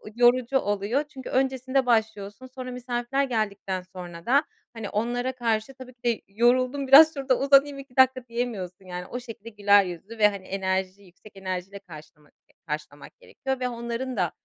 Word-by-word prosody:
yorucu 245 Hz, +2 st, +4 dB
oluyor 205 Hz, +7 st, -1 dB
çünkü 270 Hz, -3 st, -10 dB
öncesinde 265 Hz, 0 st, +1 dB
başlıyorsun, 220 Hz, -1 st, 0 dB
sonra 255 Hz, 0 st, -8 dB
misafirler 245 Hz, +2 st, -2 dB
geldikten 205 Hz, -6 st, -2 dB
sonra 175 Hz, -2 st, -9 dB
da 280 Hz, +5 st, +4 dB, 0.3 s
hani 225 Hz, -3 st, -6 dB
onlara 245 Hz, +4 st, -1 dB
karşı 230 Hz, 0 st, -1 dB
tabii 255 Hz, -1 st, -12 dB
ki 240 Hz, -, -49 dB
de 235 Hz, -2 st, +1 dB
yoruldum 255 Hz, +6 st, +2 dB
biraz 315 Hz, +4 st, +9 dB
şurada 270 Hz, -3 st, 0 dB
uzanayım 275 Hz, 0 st, +4 dB
2 270 Hz, -2 st, -13 dB
dakika 260 Hz, -1 st, +4 dB
diyemiyorsun. 210 Hz, -6 st, -4 dB
Yani, 180 Hz, 0 st, -6 dB
o 245 Hz, -, -6 dB
şekilde 230 Hz, -2 st, -10 dB
güler 205 Hz, -2 st, +4 dB
yüzlü 180 Hz, +6 st, -8 dB
ve, 210 Hz, -1 st, +6 dB
hani, 200 Hz, -2 st, -6 dB
enerji 190 Hz, 0 st, -2 dB
yüksek 190 Hz, +3 st, -18 dB
enerjiyle 190 Hz, +1 st, -5 dB
karşılamak 150 Hz, -5 st, -15 dB, 0.3 s
karşılamak 150 Hz, -1 st, -7 dB
gerekiyor 265 Hz, -1 st, -5 dB
ve 250 Hz, -, -1 dB
onların 235 Hz, +1 st, -4 dB
da, 180 Hz, -4 st, +1 dB
235 Hz, 160 wpm, -26 LUFS, 195-255 Hz, 0.3 s, biraz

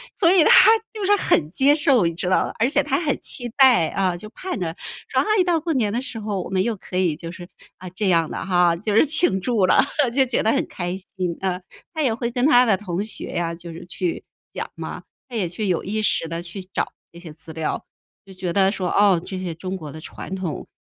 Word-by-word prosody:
所 335 Hz, -, +4 dB
以 365 Hz, -4 st, +6 dB
他 440 Hz, -, +8 dB, 0.2 s
就 430 Hz, -2 st, -5 dB
是 410 Hz, +2 st, +5 dB
很 150 Hz, -, +2 dB
接 270 Hz, -, +4 dB
受， 275 Hz, -, +3 dB
你 170 Hz, -, 0 dB
知 180 Hz, +2 st, -1 dB
道 185 Hz, -, +3 dB
吧？ -, -, -6 dB
而 230 Hz, -, +3 dB
且 -, -, +3 dB
他 -, -, 0 dB
很 295 Hz, -5 st, -1 dB
期 245 Hz, -1 st, -1 dB
待， 255 Hz, -, +5 dB
啊， 185 Hz, -2 st, 0 dB
就 215 Hz, +4 st, -10 dB
盼 370 Hz, +8 st, -5 dB
着 165 Hz, -3 st, -3 dB, 0.4 s
说， -, -, +2 dB
哎， 425 Hz, -3 st, +2 dB
到 345 Hz, -2 st, +2 dB
过 330 Hz, +1 st, -2 dB
年 225 Hz, -7 st, +1 dB
的 240 Hz, -, -1 dB
时 250 Hz, -3 st, -5 dB
候， 205 Hz, -3 st, -3 dB
我 -, -, -8 dB
们 190 Hz, 0 st, +1 dB
又 235 Hz, 0 st, -1 dB
可 185 Hz, -, -10 dB
以 180 Hz, -4 st, +1 dB
就 165 Hz, +2 st, -8 dB
是， 175 Hz, 0 st, -10 dB, 0.3 s
啊， 185 Hz, 0 st, -9 dB
这 190 Hz, +2 st, -1 dB
样 165 Hz, -3 st, +2 dB
了 -, -, -5 dB
哈， 175 Hz, -2 st, +3 dB
就 205 Hz, +5 st, -3 dB
是 225 Hz, -, +6 dB
庆 295 Hz, -, +2 dB
祝 220 Hz, -2 st, +1 dB
了。 -, -, +5 dB, 0.3 s
就 270 Hz, -1 st, +4 dB
觉 255 Hz, -, 0 dB
得 220 Hz, -, +3 dB
很 -, -, 0 dB
开 175 Hz, 0 st, -4 dB
心 185 Hz, -2 st, -4 dB
啊， 185 Hz, -2 st, -1 dB, 0.3 s
他 315 Hz, -, -2 dB
也 260 Hz, -6 st, +2 dB
会 235 Hz, +1 st, -3 dB
跟 245 Hz, +1 st, 0 dB
他 250 Hz, -4 st, +6 dB
的 215 Hz, -5 st, +3 dB
同 185 Hz, -1 st, -3 dB
学 220 Hz, -, -6 dB
呀， 170 Hz, -1 st, -2 dB
就 170 Hz, 0 st, -9 dB
是 170 Hz, +2 st, -10 dB
去 180 Hz, 0 st, -3 dB, 0.3 s
讲 -, -, -5 dB
嘛， -, -, -7 dB, 0.3 s
他 245 Hz, -, -8 dB
也 200 Hz, -6 st, 0 dB
去 205 Hz, +5 st, -3 dB
有 180 Hz, -3 st, 0 dB
意 215 Hz, +2 st, -2 dB
识 205 Hz, -5 st, +1 dB
地 165 Hz, +1 st, -4 dB
去 175 Hz, +3 st, -7 dB
找 185 Hz, -, -3 dB, 0.2 s
这 170 Hz, -, -13 dB
些 170 Hz, -2 st, -10 dB
资 160 Hz, +1 st, -9 dB
料， 160 Hz, -1 st, -3 dB, 0.4 s
就 195 Hz, -, -13 dB
觉 185 Hz, -2 st, -4 dB
得 195 Hz, 0 st, +3 dB
说， 185 Hz, -3 st, -3 dB
哦， 200 Hz, -4 st, +4 dB
这 190 Hz, -1 st, -6 dB
些 180 Hz, -3 st, -4 dB
中 185 Hz, +3 st, -5 dB
国 155 Hz, -5 st, -8 dB
的 155 Hz, -, -9 dB
传 190 Hz, -, -7 dB
统， 185 Hz, -5 st, -5 dB
190 Hz, 270 characters per minute, -22 LUFS, 175-240 Hz, 0.4 s, 他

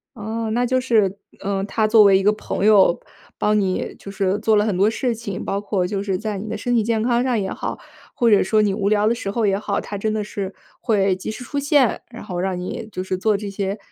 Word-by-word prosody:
哦， 220 Hz, +1 st, -4 dB
那 245 Hz, +2 st, +1 dB
就 255 Hz, +1 st, +1 dB
是 210 Hz, -6 st, +2 dB, 0.2 s
呃， 195 Hz, 0 st, -2 dB
她 215 Hz, +2 st, 0 dB
作 215 Hz, -1 st, +7 dB
为 195 Hz, -1 st, +6 dB
一 190 Hz, -, -1 dB
个 210 Hz, -, +4 dB
朋 210 Hz, -2 st, -3 dB
友 200 Hz, -5 st, +5 dB, 0.4 s
帮 210 Hz, 0 st, +2 dB
你 190 Hz, -2 st, -2 dB
就 200 Hz, -, -9 dB
是 195 Hz, 0 st, 0 dB
做 220 Hz, 0 st, +2 dB
了 210 Hz, -, +3 dB
很 210 Hz, -4 st, 0 dB
多 200 Hz, +4 st, +3 dB
事 235 Hz, +1 st, -1 dB
情， 205 Hz, -4 st, -6 dB
包 200 Hz, -, -2 dB
括 195 Hz, -3 st, -1 dB
就 195 Hz, +1 st, -3 dB
是 190 Hz, -2 st, -1 dB
在 215 Hz, 0 st, -4 dB
你 210 Hz, +3 st, -6 dB
的 -, -, -3 dB
身 245 Hz, +2 st, -1 dB
体 225 Hz, -, +3 dB
健 225 Hz, 0 st, 0 dB
康 240 Hz, +1 st, +2 dB
上 250 Hz, -4 st, +1 dB
也 190 Hz, -1 st, -2 dB
好， -, -, -4 dB, 0.3 s
或 235 Hz, -2 st, +2 dB
者 205 Hz, -, +5 dB
说 215 Hz, +3 st, +2 dB
你 205 Hz, -2 st, +1 dB
无 200 Hz, -1 st, 0 dB
聊 210 Hz, 0 st, +3 dB
的 235 Hz, -, +2 dB
时 200 Hz, -4 st, -4 dB
候 225 Hz, 0 st, 0 dB
也 195 Hz, -1 st, +2 dB
好， 210 Hz, -, -2 dB
她 205 Hz, -, -6 dB
真 215 Hz, +2 st, -1 dB
的 215 Hz, 0 st, -1 dB
是 200 Hz, -2 st, -5 dB, 0.3 s
会 200 Hz, -5 st, +2 dB
及 190 Hz, +3 st, -5 dB
时 250 Hz, -, -8 dB
出 285 Hz, -, -5 dB
现， 280 Hz, -4 st, +2 dB
然 235 Hz, 0 st, -10 dB
后 180 Hz, -1 st, -4 dB
让 185 Hz, -1 st, -2 dB
你 215 Hz, +5 st, -6 dB
就 185 Hz, -, -4 dB
是 185 Hz, -1 st, -2 dB
做 210 Hz, +2 st, +1 dB
这 205 Hz, 0 st, -5 dB
些， 195 Hz, 0 st, -3 dB
210 Hz, 280 characters per minute, -21 LUFS, 195-225 Hz, 0.4 s, 作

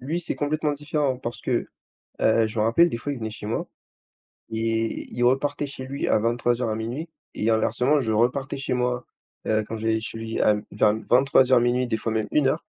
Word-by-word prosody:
lui, 155 Hz, +7 st, -2 dB
c'est 175 Hz, -, -2 dB
complètement 150 Hz, 0 st, -1 dB
différent 145 Hz, -2 st, -1 dB
parce 120 Hz, -1 st, -6 dB
que, -, -, -1 dB, 0.5 s
heu, 110 Hz, 0 st, +4 dB
je 110 Hz, +1 st, -6 dB
me 105 Hz, -, +3 dB
rappelle 165 Hz, +10 st, +5 dB
des 115 Hz, -, -3 dB
fois, 145 Hz, +4 st, -4 dB
il 135 Hz, -, -5 dB
venait 110 Hz, -1 st, -3 dB
chez 105 Hz, -, -9 dB
moi 110 Hz, -, -2 dB, 0.8 s
et 115 Hz, 0 st, -2 dB
il 120 Hz, -, -3 dB
repartait 145 Hz, +3 st, +1 dB
chez 135 Hz, -1 st, -7 dB
lui 140 Hz, +2 st, -3 dB
à -, -, +4 dB
23:00, 120 Hz, +1 st, 0 dB
à -, -, 0 dB
00:00 120 Hz, +9 st, -4 dB, 0.2 s
et 110 Hz, -, 0 dB
inversement, 125 Hz, +6 st, +2 dB
je 110 Hz, -4 st, -1 dB
repartais 125 Hz, +6 st, +1 dB
chez 140 Hz, -, -3 dB
moi, 125 Hz, 0 st, 0 dB, 0.4 s
heu, 110 Hz, 0 st, +2 dB
quand 115 Hz, -, -5 dB
j'allais 110 Hz, 0 st, 0 dB
chez 110 Hz, 0 st, -6 dB
lui 115 Hz, 0 st, -4 dB
à 105 Hz, -, +5 dB
m 105 Hz, 0 st, -3 dB
vers 105 Hz, -, +3 dB
m 110 Hz, +1 st, -2 dB
23:00-00:00 125 Hz, -1 st, +4 dB
des 110 Hz, -2 st, -1 dB
fois 115 Hz, -, -2 dB
même 110 Hz, -1 st, -1 dB
01:00. 135 Hz, -3 st, +1 dB
120 Hz, 210 wpm, -24 LUFS, 110-140 Hz, 0.8 s, rappelle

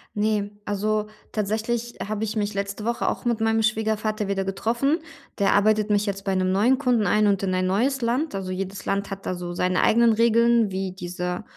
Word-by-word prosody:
Ne, 210 Hz, -1 st, 0 dB
also, 210 Hz, +1 st, -1 dB, 0.2 s
tatsächlich 220 Hz, +3 st, -2 dB
habe 215 Hz, 0 st, -2 dB
ich 215 Hz, 0 st, -3 dB
mich 210 Hz, -1 st, -1 dB
letzte 200 Hz, +1 st, -4 dB
Woche 235 Hz, +1 st, -1 dB
auch -, -, -5 dB
mit 235 Hz, -2 st, 0 dB
meinem 225 Hz, 0 st, +2 dB
Schwiegervater 215 Hz, -1 st, 0 dB
wieder 195 Hz, -1 st, -1 dB
getroffen. 235 Hz, -, 0 dB, 0.4 s
Der 200 Hz, -, +3 dB
arbeitet 215 Hz, +1 st, +3 dB
mich 205 Hz, 0 st, +2 dB
jetzt 195 Hz, -1 st, -3 dB
bei 195 Hz, -1 st, -1 dB
'nem 185 Hz, 0 st, +1 dB
neuen 225 Hz, +8 st, +3 dB
Kunden 245 Hz, -7 st, +1 dB
ein 210 Hz, +3 st, +3 dB
und 200 Hz, -2 st, +2 dB
in 195 Hz, -1 st, -1 dB
ein 185 Hz, -, +1 dB
neues 250 Hz, +9 st, +1 dB
Land. 250 Hz, +5 st, 0 dB
Also, 190 Hz, -1 st, -4 dB
jedes 190 Hz, +1 st, -5 dB
Land 200 Hz, 0 st, -1 dB
hat 195 Hz, -1 st, -7 dB
da -, -, -1 dB
so 175 Hz, -1 st, -5 dB
seine 180 Hz, +1 st, +1 dB
eigenen 235 Hz, 0 st, +4 dB
Regeln, 230 Hz, 0 st, +4 dB
wie 190 Hz, 0 st, -3 dB
diese 180 Hz, +1 st, -4 dB
210 Hz, 200 wpm, -24 LUFS, 195-225 Hz, 0.4 s, eigenen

